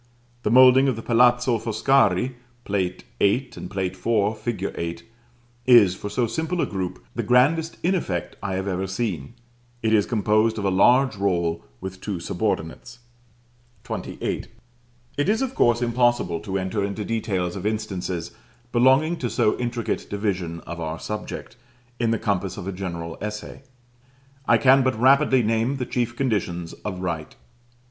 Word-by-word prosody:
The 105 - -1
moulding 130 +3 +7
of 130 - +1
the 115 - -7
Palazzo 120 0 +3
Foscari 115 0 +2 0.3
(Plate 95 -3 -2 0.2
VIII., 125 +6 +2
and - - -7
Plate 95 -1 -2
IV. 105 +2 0
fig. 110 -3 -3
8) 85 0 -4 0.6
is, 115 -7 +7
for 100 +2 -6
so 120 +3 0
simple 160 +9 -2
a - - +2
group, 90 -11 -5
the - - -2
grandest 155 +7 +2
in 180 +3 +2
effect 90 - -2
I 95 - -2
have 95 +1 -3
even 95 0 -2
seen: 95 - -3 0.5
it 110 0 +2
is 105 -2 +3
composed 110 0 +2
of 105 - -3
a 95 - +2
large 120 +5 +4
roll 85 -4 0 0.2
with 95 0 -7
two 100 -5 -3
subordinates. 90 +5 -3 0.9
XXVIII. - - -4 0.7
It 145 +6 +1
is 220 +5 +2
of 265 -1 -3
course 120 - +3
impossible 120 -7 +1
to 95 +1 -3
enter 95 +2 -2
into 100 +1 -3
details 95 -6 -2
of 100 +1 -3
instances 95 -6 -3 0.4
belonging 135 +7 +4
to 125 - -2
so 110 -2 +2
intricate 120 -1 -2
division 95 -5 -2
of 85 +1 -8
our 80 0 -3
subject, 105 +4 -6 0.4
in 120 -1 +1
the 115 - +2
compass 95 -3 -2
of 95 -2 -6
a - - -1
general 85 -3 -5
essay. 105 +4 -6 0.9
I 115 - +6
can 135 +2 +5
but 130 -3 0
rapidly 135 0 +5
name 115 +5 +1
the 125 - -2
chief 120 -1 -2
conditions 90 -10 -2
of 95 -3 -4
right. 85 -4 -4
105 Hz, 160 wpm, -24 LUFS, 95-125 Hz, 0.9 s, moulding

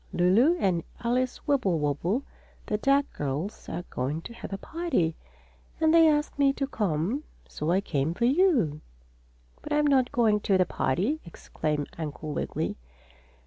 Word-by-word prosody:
"Lulu 220 - +4
and 180 - +1 0.2
Alice 250 +2 -1
Wibblewobble, 185 - +1 0.4
the 210 - -1
duck 275 +3 +3
girls, 150 +9 -4
are 175 - -4
going 145 +6 -2
to 235 - -8
have 235 - -9
a 195 - -3
party, 250 - -1 0.6
and 320 0 +4
they 330 -1 +7
asked 295 -1 0
me 275 -1 +4
to 275 - -2
come. 210 - -1 0.2
So 150 - -4
I 185 +3 +3
came 155 -3 -1
for 235 - +1
you." 260 - +3 0.8
"But - - -4
I'm 295 0 +3
not 265 -3 +3
going 225 -5 +3
to 200 -2 +2
the 185 - +3
party!" 200 - -1
exclaimed 150 -3 -3
Uncle 155 -1 -5
Wiggily. - - -3
210 Hz, 150 wpm, -27 LUFS, -, 0.8 s, they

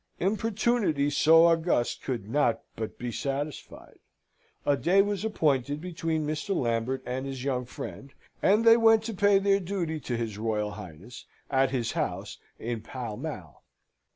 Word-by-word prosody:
Importunity 205 -6 +1
so 165 +3 +6
august 165 -7 +2
could 120 -7 -4
not 120 -2 +1
but 110 -1 -5
be 125 -1 -4
satisfied. 140 +4 -5 0.7
A 145 - +3
day 180 +7 +2
was 205 -1 -2
appointed 145 - 0
between 165 -2 -2
Mr. 155 +6 -2
Lambert 120 +2 -1
and 130 +2 -3
his 135 -2 -5
young 130 -2 -1
friend, 135 +2 -8 0.3
and 215 +4 +4
they 230 0 +8
went 225 -1 +5
to 225 0 -4
pay 200 +1 +4
their 195 0 +3
duty 175 -4 -3
to 125 -4 -3
his 110 -3 -4
Royal 105 -2 -1
Highness 95 +8 -10 0.2
at 135 -1 +3
his 125 -4 -1
house - - -3 0.2
in 115 -1 -4
Pall 120 -3 -6
Mall. - - -7
145 Hz, 155 wpm, -28 LUFS, 120-190 Hz, 0.7 s, they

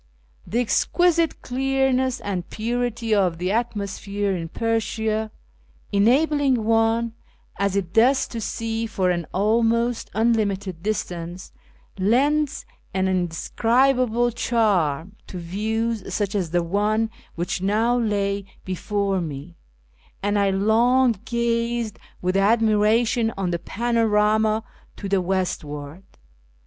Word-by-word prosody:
The 230 - -2
exquisite 335 +7 +2
clearness 265 0 +1
and 185 -4 -4
purity 235 0 -2
of 185 -5 +2
the 180 +2 -1
atmosphere 205 -3 -2
in 165 -2 -5
Persia, 220 0 -1 0.6
enabling 260 +4 +3
one 225 +1 +2 0.5
as 200 -1 +1
it 185 -3 -2
does 255 +5 +4
to 230 - -5
see 225 +1 -3
for 190 -5 0
an 170 -2 -2
almost 230 +3 +1
un 230 +2 +3
limited 200 -5 -2
distance, 180 -3 -4 0.5
lends 275 +9 +2 0.3
an 190 0 +1
indescribable 235 +7 +1
charm 200 - 0
to 185 - -7
views 220 +5 -2
such 205 -2 -1
as 190 -5 -1
the 175 +1 +1
one 210 +5 0 0.3
wliich 175 +1 -2
now 220 +5 +2
lay 200 -4 0 0.2
before 195 +1 -1
me, 155 +1 -7 0.7
and 205 0 +1
I 200 -1 +3
long 230 +6 +3
gazed 235 -1 -1 0.2
with 185 +1 0
admiration 220 +2 +3
on 185 -2 -1
the 170 - -1
panorama 220 0 +1 0.3
to 200 - -5
the 195 -1 +2
westward. 165 -4 -3
215 Hz, 110 wpm, -23 LUFS, 190-235 Hz, 0.7 s, does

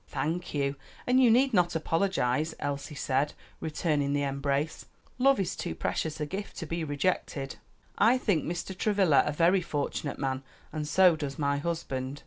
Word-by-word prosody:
"Thank 160 +5 -3
you, 140 -1 0 0.3
and 255 +1 +4
you 250 - +6
need 255 +3 +4
not 175 -4 +3
apologize," 160 -3 0
Elsie 145 +1 -4
said, 140 +1 0 0.3
returning 150 -3 0
the 145 0 +1
embrace; 140 +2 -1 0.3
"love 270 0 +5
is 190 -2 -1
too 175 - -4
precious 160 -1 -2
a 150 - -1
gift 195 +6 -6
to 165 - -4
be 165 +1 -3
rejected." 145 -2 -2 0.4
"I 230 +5 +5
think 200 - +1
Mr. 175 +2 -4
Travilla 195 -7 +4
a - - +1
very 170 +5 +3
fortunate 145 -3 -3
man, 135 -1 -2 0.3
and 155 -2 -3
so 180 +1 +5
does 145 -3 -5
my 140 -1 +1
husband." 145 -4 -3
155 Hz, 165 wpm, -29 LUFS, 140-185 Hz, 0.4 s, you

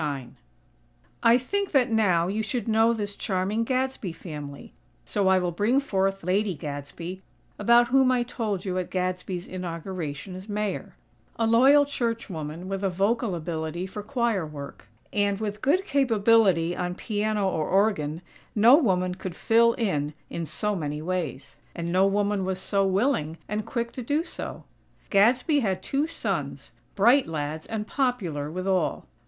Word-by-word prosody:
IX 140 -5 -3 0.9
I 230 +1 +6
think 400 +11 -2
that 260 -3 +3
now 185 -7 +3
you 205 +4 -1
should 235 +2 -3
know 225 +1 +4
this 205 -3 -3
charming 200 +2 -1
Gadsby 255 -5 -1
family; 150 -4 -8 0.3
so 195 - 0
I 190 0 +5
will 180 -1 0
bring 210 +10 +2
forth 195 -7 -1
Lady 190 +2 +1
Gadsby, 150 +6 -6 0.4
about 235 +3 +5
whom 265 0 +4
I 250 -1 +2
told 220 -6 -3
you 185 -1 -1
at 180 - -4
Gadsby's 180 0 -3
inauguration 175 -2 -5
as 185 +3 -9
Mayor; 210 -1 -3 0.4
a 230 - +1
loyal 265 +6 +6
church 230 -6 -2
woman 160 +2 -6
with 195 0 -3
a 195 - +2
vocal 200 +3 0
ability 165 +1 -3
for 200 +2 -6
choir 230 -3 0
work; 145 -7 -9 0.3
and, 205 -1 +1
with 210 -1 -4
good 345 +9 +2
capability 220 - +3
on 180 0 -3
piano 210 0 -1
or 160 -5 -1
organ, 180 -5 +1 0.3
no 225 +5 +8
woman 185 - +1
could 185 -2 -6
"fill 230 +3 +4
in" 150 -11 -1 0.2
in 170 -1 -4
so 210 +5 -1
many 150 -3 -3
ways; 170 -6 -4 0.2
and 170 0 -3
no 190 +2 +4
woman 205 0 +1
was 185 0 -1
so 195 +1 +1
willing, 190 - +1
and 210 +1 -3
quick 235 0 -2
to 255 - -6
do 290 +7 0
so. - - -7 0.5
Gadsby 245 - +4
had 195 -7 -1
two 285 +3 0
sons; 330 - -4 0.2
bright 240 +7 +5
lads 155 0 -4
and 220 -1 -3
popular 200 - -1
with 185 +4 -4
all. 185 -3 0
195 Hz, 160 wpm, -26 LUFS, 175-230 Hz, 0.9 s, no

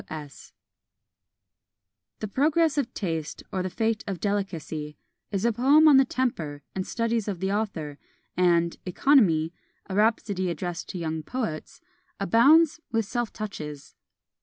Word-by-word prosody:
"W. 155 -1 -5
S." 140 - -15 1.7
"The 215 - -2
Progress 305 +7 +2
of 250 -4 -2
Taste; 165 -5 -3
or 190 - -1
the 185 - -2
Fate 220 +3 -1
of 195 -3 -3
Delicacy," 165 -7 -3 0.3
is 200 +1 -2
a 235 - +3
poem 280 +7 +5
on 290 -3 +8
the 270 - +6
temper 170 - -2
and 190 -1 -3
studies 230 -2 -1
of 195 -4 -3
the 190 +1 -1
author; 175 -9 -3 0.4
and 170 -2 +2
"Economy; 180 - +3 0.3
a 190 - -6
Rhapsody 205 -3 +1
addressed 175 0 -4
to - - -5
Young 160 -2 -3
Poets," 170 - -5 0.4
abounds 280 - +5
with 225 -2 +1
self 240 +2 -2
touches. 150 -9 -7
195 Hz, 140 wpm, -26 LUFS, 165-235 Hz, 1.7 s, on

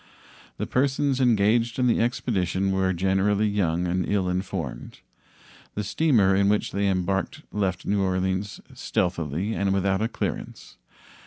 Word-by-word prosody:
The - - -2
persons 135 0 +1
engaged 115 0 +2
in 130 - +2
the 120 - +3
expedition 95 -5 0
were 95 -1 +1
generally 95 +3 +1
young 90 -4 0
and 90 +1 0
ill 100 -2 +1
informed. 90 -9 -4 0.8
The 105 - -2
steamer 105 -5 +3
in 100 +1 +3
which 105 0 +1
they 100 0 0
embarked 95 - -1
left 95 -3 -2
New 100 0 +1
Orleans 95 +1 -1
stealthily 85 +3 -2
and 100 -2 0
without 95 0 +1
a 110 - +1
clearance. - - -5
100 Hz, 140 wpm, -25 LUFS, 95-110 Hz, 0.8 s, the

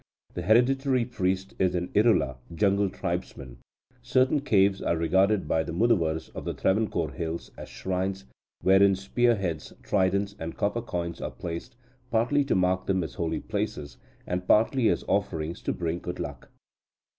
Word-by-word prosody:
The 90 - -4
hereditary 125 +5 +3
priest 95 -5 -2
is 90 -1 +2
an 90 0 -2
Irula 105 - +3 0.2
(jungle 100 +1 +2
tribesman). 65 -8 -5 0.4
Certain 130 +3 +2
caves 100 -7 +2
are 85 - 0
regarded 95 +5 +2
by 80 - +2
the 80 +1 -5
Muduvars 85 -6 +1
of - - -8
the - - -4
Travancore 95 -6 0
hills 80 +5 -5
as - - -9
shrines, 95 +1 -3 0.4
wherein 95 +1 +5
spear 120 +5 +2
heads, 85 -6 -4
tridents, 100 +1 +1
and 80 0 -6
copper 105 +4 0
coins 85 -6 -4
are - - -3
placed, 85 +8 -7 0.3
partly 120 +5 +2
to 135 - +1
mark 95 0 +1
them 95 -2 +1
as 75 -6 -6
holy 80 +2 -2
places, 70 -4 -4 0.3
and 90 0 -3
partly 115 +2 +4
as - - 0
offerings 80 +2 -1
to - - -1
bring 85 0 -2
good 90 +1 -6
luck. 70 -6 -6
95 Hz, 155 wpm, -27 LUFS, 85-110 Hz, 0.4 s, wherein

